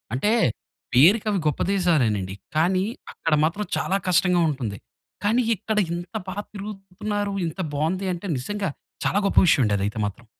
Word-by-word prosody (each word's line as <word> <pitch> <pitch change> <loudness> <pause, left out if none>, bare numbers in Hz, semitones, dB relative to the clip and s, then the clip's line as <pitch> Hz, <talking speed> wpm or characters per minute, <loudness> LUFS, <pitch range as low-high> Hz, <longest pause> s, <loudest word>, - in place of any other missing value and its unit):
అంటే, 180 +12 +1 0.6
పేరికి 175 - +6
అవి 195 - +1
గొప్ప 150 - 0
దేశాలేనండి. 120 - +1 0.2
కానీ, 185 +4 +2 0.3
అక్కడ 165 - -1
మాత్రం 200 +6 -1
చాలా 195 - +1
కష్టంగా 180 0 +3
ఉంటుంది. 120 -8 -3 0.5
కానీ, 225 +4 +3
ఇక్కడ 215 +1 -3 0.2
ఇంత 175 +5 -6
బాగా 200 +2 -4
తిరుగుతున్నారు, 205 0 -4
ఇంత 165 +4 -7 0.2
బావుంది 175 +6 0
అంటే, 175 +3 -6
నిజంగా 195 +9 -3 0.4
చాలా 200 - +2
గొప్ప - - -3
విషయమండి 115 -10 +4
అదైతే 100 +3 -2
మాత్రం. 105 +4 -6
180 Hz, 145 wpm, -24 LUFS, 140-200 Hz, 0.6 s, పేరికి